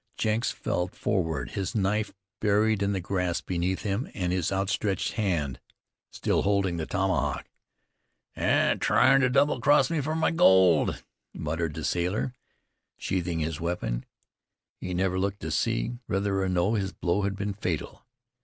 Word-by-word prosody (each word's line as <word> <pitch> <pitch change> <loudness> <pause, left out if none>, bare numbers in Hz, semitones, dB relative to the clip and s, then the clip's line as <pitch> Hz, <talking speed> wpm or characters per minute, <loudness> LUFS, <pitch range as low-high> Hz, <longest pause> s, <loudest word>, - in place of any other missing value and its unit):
Jenks 110 +1 +1
fell 90 0 -2
forward, 80 - -2
his 95 +1 -3
knife 105 +1 0 0.3
buried 105 0 +2
in 100 0 +1
the 95 - -1
grass 90 -1 -1
beneath 90 +1 -2
him, 105 +5 -2
and 90 -2 -1
his 90 -1 0
outstretched 95 0 0
hand 85 - -1 0.5
still - - 0
holding 100 -3 +1
the 80 - -3
tomahawk. 95 -1 0 0.9
"Tryin' 135 0 +3
ter 130 - +3
double 140 +3 +2
cross 150 +3 +4
me 160 -3 +1
fer 155 +3 -2
my 160 - +2
gold," 95 - +4 0.3
muttered 80 0 -2
the - - -5
sailor, 90 +8 -1 0.6
sheathing 85 -3 -2
his 80 0 -3
weapon. 85 -9 -2 0.8
He 90 -1 -4
never 95 0 0
looked 100 +1 -2
to - - -4
see 120 - -1
whether 95 0 0
or 95 - 0
no 90 +4 +1
his 100 -3 -1
blow 90 +3 0
had 100 0 -1
been 100 +1 -3
fatal. 90 -6 -4
95 Hz, 150 wpm, -27 LUFS, 90-105 Hz, 0.9 s, cross